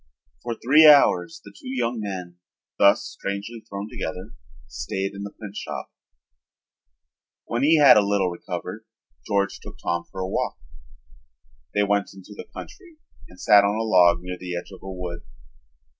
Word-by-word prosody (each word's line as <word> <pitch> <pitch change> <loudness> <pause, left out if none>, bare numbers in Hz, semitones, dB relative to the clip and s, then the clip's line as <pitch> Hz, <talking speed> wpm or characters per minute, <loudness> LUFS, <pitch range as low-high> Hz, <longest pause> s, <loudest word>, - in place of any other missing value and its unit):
For 120 -1 -4
three 150 +7 +6
hours 90 - +5
the 100 - -11
two 115 - -10
young 120 -2 -2
men, 90 -4 -6 0.4
thus 100 0 +5
strangely 100 +4 -6
thrown 100 +1 -5
together, 95 +2 -6 0.3
stayed 95 +10 -4
in 100 - -8
the 100 - -5
printshop. 105 -1 -8 1.5
When 120 +1 -2
he 155 +4 +5
had 145 -6 +8
a - - +6
little 100 -2 +1
recovered 85 - -6 0.4
George 100 -1 0
took - - -12
Tom 85 0 -2
for 95 - -8
a 95 - -2
walk. - - -2 1.2
They 105 - +3
went 100 -1 0
into 95 +2 -13
the - - -9
country 350 -5 -12 0.3
and 90 - -17
sat 105 -3 +6
on 100 +1 +1
a 110 - -1
log 90 -4 +4
near 90 -1 -6
the 90 -1 -5
edge 90 - -8
of 95 - -12
a 95 - -8
wood. 90 -2 -6
100 Hz, 160 wpm, -24 LUFS, 90-115 Hz, 1.5 s, had